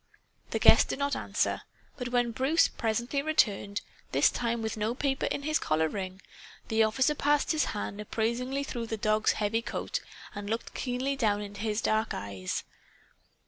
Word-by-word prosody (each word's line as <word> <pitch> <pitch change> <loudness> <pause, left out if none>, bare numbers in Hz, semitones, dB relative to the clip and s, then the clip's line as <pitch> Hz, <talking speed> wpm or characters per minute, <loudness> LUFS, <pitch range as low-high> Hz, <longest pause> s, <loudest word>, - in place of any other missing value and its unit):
The - - -1
guest - - +6
did - - -1
not 280 0 0
answer. - - 0 0.3
But 250 -2 -4
when 245 -1 +2
Bruce 265 +8 +3
presently 235 +5 -1
returned, 205 -9 +1 0.3
this - - +5
time 235 -1 -1
with 220 - -2
no 220 +2 -1
paper 270 0 0
in 280 - -2
his 310 +1 +1
collar 160 +1 +1
ring, 190 +2 -5 0.5
the 225 0 +3
officer 255 +7 +3
passed 295 0 +2
his 315 -2 +2
hand 205 0 -4
appraisingly 240 +6 -1
through 235 -4 -4
the 220 - -3
dog's 215 +1 +2
heavy 220 +2 0
coat - - -3 0.3
and 205 0 -6
looked 225 +1 -3
keenly 260 +2 -1
down 210 -5 +1
into 205 0 -8
his 215 0 -1
dark 220 +1 +1
eyes. 100 -2 -4
225 Hz, 170 wpm, -29 LUFS, 210-265 Hz, 0.5 s, guest